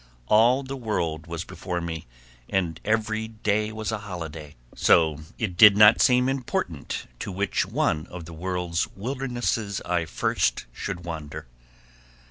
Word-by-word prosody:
All 120 +5 +5
the 135 +1 -5
world 85 - -2
was 85 0 -4
before 90 -1 -4
me 80 -4 -5 0.4
and 85 -4 -1
every 110 0 0
day 110 -1 -1
was 110 0 -3
a 110 - -2
holiday, 80 -7 -7 0.2
so 80 -3 +4 0.2
it 100 -6 -2
did 105 +2 +8
not 105 +1 +8
seem 125 -1 +4
important 120 - -3
to - - -4
which 100 +2 0
one 75 0 0
of 85 -2 -8
the 85 - -10
world's 90 0 -2
wildernesses 120 -3 -2
I 85 -2 -1
first 75 - 0
should 90 +3 -5
wander. 80 -2 -6
95 Hz, 140 wpm, -25 LUFS, 85-110 Hz, 0.4 s, did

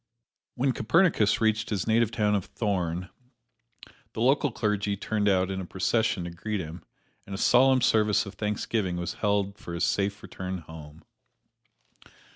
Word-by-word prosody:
When 130 +2 +1
Copernicus 125 - +2
reached 110 -1 +1
his 100 -4 -1
native 115 0 +3
town 105 -2 +1
of 100 -3 0
Thorn, 90 -4 -2 1.0
the - - -6
local 140 +4 +3
clergy 105 -3 -1
turned 105 0 0
out 95 -1 +2
in 95 0 -3
a - - -6
procession 95 +1 0
to 85 - -5
greet 105 +5 -4
him, 80 0 -7 0.4
and 100 - -5
a - - -4
solemn 130 +4 +4
service 105 -2 +3
of 100 - -8
thanksgiving 105 -2 -2
was 85 0 -3
held 100 0 0
for 85 - -7
his 85 - -2
safe 100 0 -1
return 95 0 -5
home. 80 -2 -12
105 Hz, 155 wpm, -27 LUFS, 95-110 Hz, 1.0 s, solemn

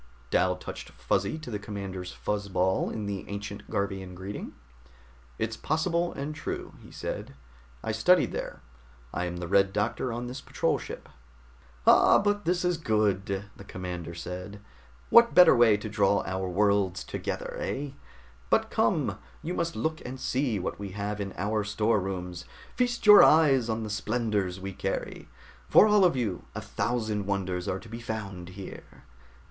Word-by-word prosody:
Dal - - +3
touched - - -8
Fuzzy - - -1
to 155 -6 -8
the 105 - -3
commander's 100 -3 -6
fuzz 100 -1 -3
ball 95 0 +1
in 110 -2 -4
the 100 -1 -3
ancient 100 0 -6
Garvian 95 -2 -3
greeting. 95 +3 -6 0.8
"It's 115 0 -2
possible, 170 +5 0
and 140 +2 -4
true," 155 - -5
he - - -14
said. - - -6 0.5
"I - - -1
studied 180 +12 +4
there. - - -5 0.5
I 90 - -1
am 90 0 -4
the 85 0 -4
Red 100 +1 +3
Doctor 105 +4 -1
on 120 +1 -4
this 125 +3 -6
patrol - - 0
ship." - - -8 0.8
"Ah, - - +7
but 205 0 0
this 180 +1 +1
is 180 -1 +1
good," 100 - 0
the - - -11
commander 90 -3 -6
said. 90 +4 -7 0.5
"What 235 0 +7
better 180 -6 +9
way 115 -3 +6
to 105 - -6
draw 100 -1 +2
our 95 0 -2
worlds 100 -1 +2
together, - - -4
eh? 140 +1 -3 0.6
But - - +2
come, - - +1 0.2
you 170 - -3
must 170 -2 -2
look 160 0 -2
and 130 +1 -7
see 130 -4 0
what 95 - -4
we 100 -2 -6
have 105 0 -3
in 100 -1 -4
our 105 +2 0
storerooms, 95 -4 -1 0.3
feast 245 -2 0
your 210 -1 +10
eyes 140 -7 +5
on 110 0 -1
the 110 - -5
splendors 105 -4 -1
we 95 +1 -5
carry. 95 +1 -4 0.4
For - - +8
all 210 -2 +5
of 180 -5 +4
you, 110 -8 -2
a - - -3
thousand 110 -4 -2
wonders 95 -3 -2
are 95 - -1
to 110 - -13
be 115 +1 -7
found 100 -6 -5
here." 95 - -10
105 Hz, 165 wpm, -28 LUFS, 95-125 Hz, 0.8 s, your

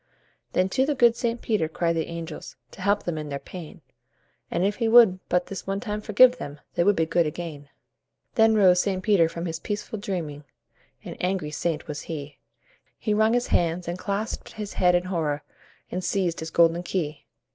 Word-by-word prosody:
Then 185 - +2
to 260 +7 +2
the 295 - +1
good 240 -3 +5
St. 235 -1 -2
Peter 205 -9 0
cried 170 +1 0
the 160 - -1
angels 165 -2 -7 0.2
To - - -12
help 205 +2 +2
them 165 -3 -3
in 150 -1 -6
their 140 - -3
pain, 165 +2 -10 0.7
And 180 - 0
if 205 +1 0
he 230 - 0
would 225 -5 +7
but 180 0 +2
this 195 -2 -7
one 195 0 -1
time 210 -1 -4
forgive 250 +4 +5
them, 145 -7 -7
They 170 - +2
would 205 +2 +4
be 165 - +2
good 165 0 +2
again. 150 -3 -6 0.6
Then 220 -2 +4
rose 185 -4 +5
St. 185 0 -1
Peter 185 -6 +4
from 170 +1 -5
his 165 -1 -3
peaceful 210 +2 -4
dreaming 165 -8 -4 0.6
An - - -8
angry 180 -4 -1
saint 165 0 -2
was 145 -1 -5
he 145 -3 -7 0.6
He 215 - -1
wrung 220 +2 +3
his 245 0 0
hands 170 +1 +1
and 175 +1 -3
clasped 205 +3 -3
his 210 -2 -6
head 180 -1 +3
in 175 - +2
horror, 160 -5 -2 0.5
And 185 - -3
seized 180 -3 0
his 160 - -5
golden 170 +1 +3
key. 165 -4 -3
180 Hz, 200 wpm, -25 LUFS, 165-210 Hz, 0.7 s, would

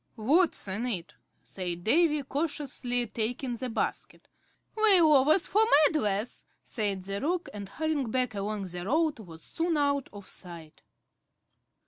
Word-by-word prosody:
"What's 285 - +2
in 205 +6 -1
it?" 175 -9 -3 0.3
said 175 -2 -5
Davy, 300 - +2
cautiously 270 -4 -2
taking 240 +3 -3
the 250 +2 -5
basket. 225 - -4 0.5
"Lay 430 -4 +6
overs 310 +2 +5
for 425 - +2 0.2
meddlers," 215 -7 -1 0.2
said 200 -5 -2
the 195 +1 -4
Roc, 350 +4 -1
and, 200 -2 -7
hurrying 310 -2 -2
back 250 0 0
along 205 0 -3
the 175 -1 -6
road, 305 - 0
was 165 -6 -12
soon 330 -1 -1
out 280 -2 0
of 200 -2 -11
sight. 165 -4 -11
245 Hz, 135 wpm, -28 LUFS, 200-300 Hz, 0.5 s, Lay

